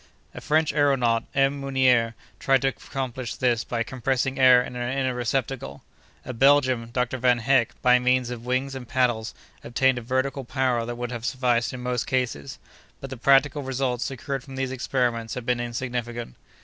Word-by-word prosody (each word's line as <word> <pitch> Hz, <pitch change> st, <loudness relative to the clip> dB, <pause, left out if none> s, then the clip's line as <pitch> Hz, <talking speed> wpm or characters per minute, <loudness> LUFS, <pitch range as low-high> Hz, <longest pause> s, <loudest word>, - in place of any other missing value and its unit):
A -, -, -8 dB
French 155 Hz, 0 st, +1 dB
aëronaut, 130 Hz, -6 st, +2 dB
M. 135 Hz, +1 st, +2 dB
Meunier, 130 Hz, -4 st, +2 dB, 0.2 s
tried 135 Hz, 0 st, +2 dB
to 135 Hz, -, +3 dB
accomplish 130 Hz, -2 st, -5 dB
this 120 Hz, -3 st, +1 dB
by 115 Hz, -1 st, -2 dB
compressing 130 Hz, +2 st, -2 dB
air 130 Hz, -1 st, +7 dB
in 125 Hz, -, -8 dB
an 125 Hz, +2 st, -3 dB
inner 130 Hz, -2 st, 0 dB
receptacle. 125 Hz, -, -3 dB, 0.4 s
A 130 Hz, -, -5 dB
Belgian, 130 Hz, -2 st, +3 dB
Dr. 125 Hz, +1 st, -1 dB
Van 125 Hz, 0 st, +3 dB
Hecke, 125 Hz, -1 st, +1 dB
by 125 Hz, 0 st, +5 dB
means 125 Hz, 0 st, +1 dB
of 120 Hz, -2 st, -6 dB
wings 130 Hz, +2 st, -1 dB
and 130 Hz, -3 st, -7 dB
paddles, 120 Hz, -3 st, 0 dB, 0.3 s
obtained 130 Hz, +1 st, +1 dB
a -, -, -9 dB
vertical 130 Hz, +3 st, -1 dB
power 125 Hz, -2 st, -1 dB
that 120 Hz, -, -4 dB
would 120 Hz, 0 st, -5 dB
have 120 Hz, -2 st, -6 dB
sufficed 125 Hz, -2 st, 0 dB
in 125 Hz, -2 st, -7 dB
most 125 Hz, -2 st, -2 dB
cases, 120 Hz, -, -2 dB, 0.4 s
but 135 Hz, -, -8 dB
the -, -, -4 dB
practical 140 Hz, +3 st, +3 dB
results 130 Hz, -2 st, -2 dB
secured 135 Hz, 0 st, -4 dB
from 135 Hz, 0 st, -10 dB
these 130 Hz, -1 st, -2 dB
experiments 120 Hz, -3 st, -1 dB
have 125 Hz, -2 st, -6 dB
been 125 Hz, 0 st, 0 dB
insignificant. 120 Hz, -, -4 dB
125 Hz, 175 wpm, -25 LUFS, 120-135 Hz, 0.4 s, air